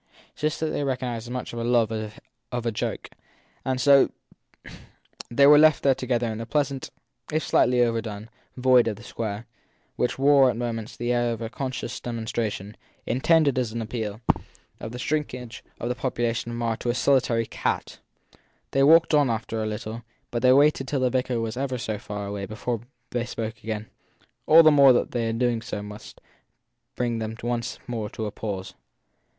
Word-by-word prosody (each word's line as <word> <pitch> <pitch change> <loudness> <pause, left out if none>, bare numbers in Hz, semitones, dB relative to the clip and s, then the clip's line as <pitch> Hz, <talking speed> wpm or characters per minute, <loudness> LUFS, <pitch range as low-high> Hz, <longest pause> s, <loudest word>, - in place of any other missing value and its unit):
This 150 0 0
they 155 -2 -1
recognised 125 -4 -3
as - - -9
much 125 -1 -5
as 120 - -4
his 115 - -2
love 120 -2 +3 0.6
of 120 -1 -3
a 115 - +1
joke, 105 - -4 0.5
and 130 -1 -1
so 140 +1 +6 1.2
they 140 +4 +4
were 145 +1 +8
left 155 -1 +5
there 135 - +5
together 120 -2 -1
in 110 - -5
the 115 - -5
pleasant, 140 -3 -1 0.4
if 155 0 0
slightly 125 0 +3
over 115 -1 +2
done, 105 -1 -7 0.3
void 125 -2 +5
of 110 - -1
the 115 - -13
square, 110 -1 -5 0.5
which 125 - 0
wore 135 -1 +5
at 125 - -2
moments 115 -2 -4
the 120 +1 0
air 120 -1 +1
of 115 - -6
a 115 - -5
conscious 130 -1 -4
demonstration, 110 -3 -4 0.3
intended 140 +2 +3
as 120 -3 -2
an 115 - -3
appeal, 110 -1 -4 0.6
of 110 - -6
the 125 - -6
shrink 150 +1 -1
age 125 -2 -9 0.2
of 120 - -3
the 125 - 0
population 120 -2 -2
of 120 - -5
Marr 115 -1 -1
to 120 - -3
a 120 - +1
solitary 125 -4 +2
cat. - - -3 0.7
They 135 - +2
walked 160 +4 +6
on 145 -3 +4
after 115 0 -2
a 110 - -1
little, 110 +1 -5 0.3
but 120 - -2
they 125 - +6
waited 140 0 +4
till 135 -1 -1
the 125 -1 +2
vicar 125 -2 0
was 115 0 -3
ever 130 0 -2
so 110 -3 -3
far 105 -2 -6
away 100 -1 -4
before 110 +2 -3 0.3
they 120 -1 -1
spoke 110 -2 -5
again; 110 -1 -3 0.6
all 165 +1 +9
the 155 - +7
more 140 -3 +7
that 120 - 0
their 115 -2 -1
doing 115 0 0
so 110 -3 -5
must 105 +1 -10 0.8
bring 120 -2 -1
them 110 0 -4
once 120 0 -2
more 115 -4 -3
to 110 - -5
a 105 - -3
pause. 95 -3 -5
120 Hz, 190 wpm, -25 LUFS, 110-130 Hz, 1.2 s, all